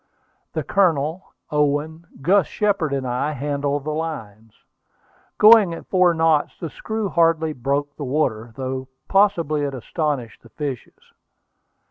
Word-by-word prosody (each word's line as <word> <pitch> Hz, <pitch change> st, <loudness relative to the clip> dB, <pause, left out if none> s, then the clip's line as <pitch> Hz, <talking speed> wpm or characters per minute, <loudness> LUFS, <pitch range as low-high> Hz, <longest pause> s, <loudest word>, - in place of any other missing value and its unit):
The -, -, -2 dB
Colonel, 170 Hz, -3 st, 0 dB, 0.2 s
Owen, 150 Hz, +3 st, 0 dB, 0.2 s
Gus 190 Hz, +3 st, +4 dB
Shepard, 200 Hz, -8 st, 0 dB
and 135 Hz, -1 st, -2 dB
I, 125 Hz, +5 st, -1 dB
handled 145 Hz, 0 st, -2 dB
the 155 Hz, -, -3 dB
lines. 115 Hz, -9 st, -6 dB, 0.8 s
Going 210 Hz, -5 st, +7 dB
at -, -, -10 dB
four 180 Hz, -2 st, +3 dB
knots, 160 Hz, -2 st, +2 dB
the 165 Hz, -4 st, -5 dB
screw 220 Hz, -1 st, -3 dB
hardly 165 Hz, -2 st, +2 dB
broke 140 Hz, +2 st, -2 dB
the 150 Hz, -, -6 dB
water, 125 Hz, -5 st, -1 dB
though 130 Hz, 0 st, -4 dB, 0.2 s
possibly 175 Hz, -7 st, +2 dB
it 140 Hz, -2 st, -2 dB
astonished 135 Hz, -3 st, -3 dB
the 115 Hz, -, -17 dB
fishes. 135 Hz, 0 st, -7 dB
150 Hz, 130 wpm, -22 LUFS, 135-165 Hz, 0.8 s, Going